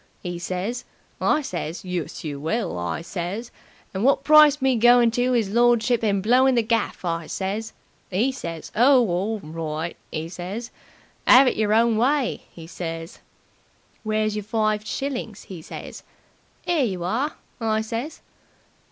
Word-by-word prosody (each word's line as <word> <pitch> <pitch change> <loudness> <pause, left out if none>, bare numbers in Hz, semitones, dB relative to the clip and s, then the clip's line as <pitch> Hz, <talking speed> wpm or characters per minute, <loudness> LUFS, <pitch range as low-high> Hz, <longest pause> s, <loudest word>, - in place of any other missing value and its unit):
'e 175 -1 -4
says. 185 +7 -3 0.4
I 305 - +2
says, 175 - -5
'Yus, 180 -4 -4
you 145 -3 -5
will!' 175 - -2
I 85 - -3
says. 190 +7 -5 0.4
'And 190 +2 -2
wot 275 +1 +3
price 300 -1 +7
me 265 -2 +2
goin' 240 0 +5
to 245 +2 +1
'is 215 -5 0
lordship 240 +1 +3
and 200 -3 +1
blowing 255 +4 +4
the 235 - +3
gaff?' 225 -4 -1
I 165 -1 -2
says. 205 +3 -3 0.4
'E 220 +9 +1
says, 170 -11 -7
'Oh, 250 +3 +6
orl 200 +4 -1
right!' 160 +1 -4 0.2
'e 160 0 -3
says. 185 +7 -6 0.6
'Ave 255 0 +8
it - - -7
yer 210 -1 +1
own 230 0 +3
way!' 260 +2 +1
'e 165 - -10
says. 165 -1 -6 0.8
"'Where's 215 -1 0
yer 210 - -2
five 215 0 -1
shillings?' 250 -6 -4
'e 180 -4 -7
says. - - -9 0.6
''Ere 335 -5 +2
yer 190 -7 -2
are!' 250 - -1 0.3
I 220 -1 +1
says. 230 +8 -5
215 Hz, 150 wpm, -23 LUFS, 180-245 Hz, 0.8 s, Ave